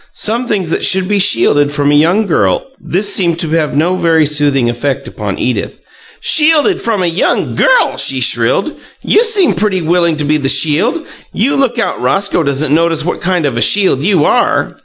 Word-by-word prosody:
Some 235 +3 -1
things 190 -7 -2
that - - -2
should 190 -1 +2
be 205 0 0
shielded 145 -7 +2
from 145 0 0
a - - +2
young 170 +9 +2
girl 100 - 0
" - - -33
This 195 +4 +1
seemed 170 -4 +1
to 165 - -2
have 155 -3 -1
no 175 +5 +1
very 165 -3 +1
soothing 145 -4 +1
effect 125 +3 -3
upon - - -6
Edith. - - -4 0.4
"'Shielded 320 +5 +2
from 215 -5 -2
a - - 0
young 170 +2 -1
girl'!" - - +1
she - - +2
shrilled. - - +1 0.3
"You 435 - +2
seem 415 - +2
pretty 190 0 -2
willing 170 -1 0
to 150 - -2
be 155 +1 +1
the 135 -2 -2
shield! 155 - +1 0.3
You 245 +8 -1
look 260 -3 -1
out 235 - -3
Roscoe 195 -3 -1
doesn't 140 0 -1
notice 165 -1 0
what 180 - -4
kind 180 -3 -1
of 130 -5 -2
a - - -2
shield 190 -9 +2
you 180 -2 +1
are!" - - 0
170 Hz, 200 wpm, -12 LUFS, 150-210 Hz, 0.4 s, should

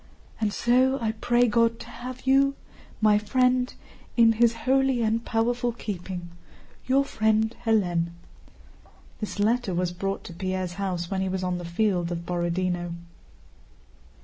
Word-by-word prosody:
And 215 -2 0
so 255 +4 +3
I 225 -2 0
pray 240 +2 +2
God 230 +1 +2
to - - -8
have 250 +2 -8
you, 275 +1 +4 0.5
my 210 -1 +5
friend, 250 +3 +2 0.5
in 230 -1 +7
His 230 +1 +3
holy 265 -2 +3
and 225 +1 +1
powerful 240 +2 0
keeping—Your 190 +6 -4
friend 220 -2 +1
Hélène. 180 -7 +2 1.1
This 215 - -5
letter 215 -2 +1
was 180 0 0
brought 195 +2 -3
to 170 - -9
Pierre's 185 0 -3
house 180 -2 -2
when 190 -1 0
he 190 - -1
was 185 0 -2
on 180 -1 -1
the 175 - -6
field 175 -1 0
of 170 0 -4
Borodinó. 175 0 -1
215 Hz, 140 wpm, -26 LUFS, 180-240 Hz, 1.1 s, in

